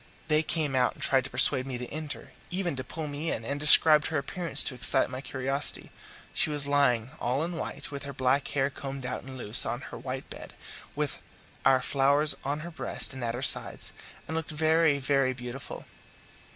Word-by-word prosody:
They 155 0 +4
came 155 -3 -1
out 125 -1 +2
and - - -5
tried 135 -2 +2
to - - -6
persuade 130 +1 +4
me 130 -2 -4
to 125 - -6
enter, 155 0 -6 0.2
even 180 -4 -2
to 130 - -5
pull 155 +5 -6
me 150 +2 -4
in, 110 - -4
and 140 +3 -3
described 150 0 +7
her 160 - -2
appearance 170 +5 -1
to - - -2
excite 125 +1 +4
my 130 0 -5
curiosity. 135 +1 -2 0.4
She - - +2
was 145 -1 +2
lying 130 -4 +2
all 130 +5 -1
in 170 +1 -4
white, 145 -4 -6
with 140 -1 -6
her 140 - -6
black 130 +1 +1
hair 140 0 0
combed 135 -1 -7
out 125 - -4
and 130 0 -10
loose, 110 -2 +3
on 120 +2 -3
her - - -6
white 130 0 -6
bed, - - -10 0.4
with - - -3 0.4
our 130 -1 +4
flowers 140 +2 +3
on 145 +2 -3
her 170 +2 -8
breast 160 - -2
and 130 -2 -7
at 115 0 -2
her 125 - -5
sides, - - +1 0.3
and 160 - -4
looked 160 -1 -3
very, 160 -1 +2
very 135 -1 +1
beautiful. 125 +1 -8
140 Hz, 205 wpm, -28 LUFS, 130-150 Hz, 0.4 s, described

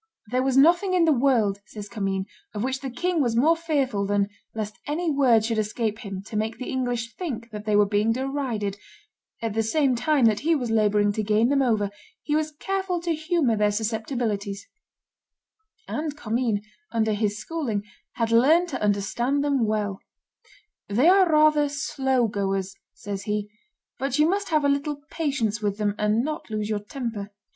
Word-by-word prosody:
"There 255 +1 +2
was 265 0 +1
nothing 350 +6 +5
in 345 -2 +4
the 320 - +5
world," 235 -7 +2
says 210 -1 -8
Commynes, 195 -2 -2 0.3
"of 205 - -2
which 265 +1 -1
the 270 - -5
king 350 +6 0
was 240 -4 +1
more 305 +8 +4
fearful 275 -11 -1
than 200 0 +1 0.3
lest 215 -1 -4
any 320 +3 0
word 250 -6 +4
should 225 -1 0
escape 215 0 -2
him 195 -4 -6
to 215 - -9
make 220 +1 -1
the 255 - -5
English 245 -3 -2
think 240 -10 -5
that 210 0 -7
they 210 -1 +2
were 205 0 +6
being 205 +2 +1
derided; 245 -6 -2 0.6
at 225 -2 -1
the 225 - +1
same 270 +4 +2
time 275 +1 +2
that 215 -2 +3
he 325 +2 +2
was 245 -6 -2
laboring 210 -2 +3
to 215 - -2
gain 215 +3 +2
them 280 0 +3
over, 215 -6 +1 0.3
he 295 - 0
was 310 0 0
careful 380 +3 -2
to 340 -1 0
humor 315 -6 +1
their 210 0 +2
susceptibilities;" 215 -2 -2 1.2
and 300 -1 -3
Commynes, 225 -4 -1 0.3
under 220 -2 +1
his 205 -1 0
schooling, 225 -4 -3 0.3
had 230 -1 -1
learned 310 +10 +5
to 265 - -4
understand 225 +7 0
them 275 -6 +1
well: 210 -2 -1 0.9
"They 245 +11 +4
are 375 -1 +5
rather 305 -1 +4
slow 265 -3 0
goers," 195 -2 -2 0.2
says 200 0 -6
he, 210 0 -2 0.5
"but 270 0 -1
you 300 +1 +5
must 400 +3 0
have 305 -3 +2
a - - +5
little 280 +1 0 0.2
patience 255 -9 -1
with 205 -1 -1
them, 210 -1 0
and 210 +2 +2
not 305 0 -4
lose 215 0 -2
your 210 - 0
temper. 210 -2 -5
235 Hz, 180 wpm, -25 LUFS, 210-290 Hz, 1.2 s, were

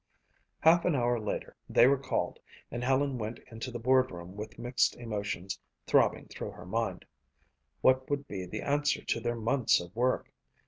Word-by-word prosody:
Half 165 +1 +6
an 180 - +3
hour 120 -2 +2
later 105 -1 -4
they - - +6
were 135 +1 +4
called 125 -10 -2 0.3
and 120 - -3
Helen 135 0 +1
went 110 +2 -4
into 115 +3 -5
the 120 - -5
board 130 +2 +3
room 90 +1 -9
with 105 +2 -7
mixed 125 +1 +1
emotions 100 -4 -4 0.3
throbbing - - +3
through - - -6
her 90 - -11
mind. 115 +5 -2 0.8
What 130 0 +4
would 145 -1 -1
be 95 -3 -5
the - - -5
answer 145 +1 +1
to - - 0
their 120 +1 -1
months 115 +2 +3
of 90 +1 -9
work? 125 +2 +1
120 Hz, 175 wpm, -31 LUFS, 105-130 Hz, 0.8 s, Half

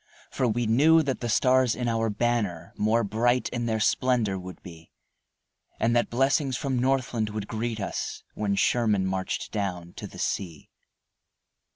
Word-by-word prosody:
For 130 - 0
we 120 +1 0
knew 155 +9 +5
that 135 -3 -2
the 120 - -3
stars 125 +2 +3
in 125 -1 -2
our 115 -1 +1
banner 105 -5 -1
More 110 +2 +2
bright 120 +4 +1
in 120 -1 -3
their 110 -1 0
splendor 110 -4 +1
would 90 0 -9
be, 85 -3 -12 0.9
And 115 +1 +2
that 120 - +2
blessings 135 +1 +1
from 135 -3 -1
Northland 125 -4 0
would 105 -1 -5
greet 115 0 -3
us 100 - -4
When 100 -2 -1
Sherman 105 -3 +2
marched 95 0 -3
down 90 -5 -3
to - - -6
the - - -13
sea. 85 -6 -4
115 Hz, 160 wpm, -26 LUFS, 100-125 Hz, 0.9 s, knew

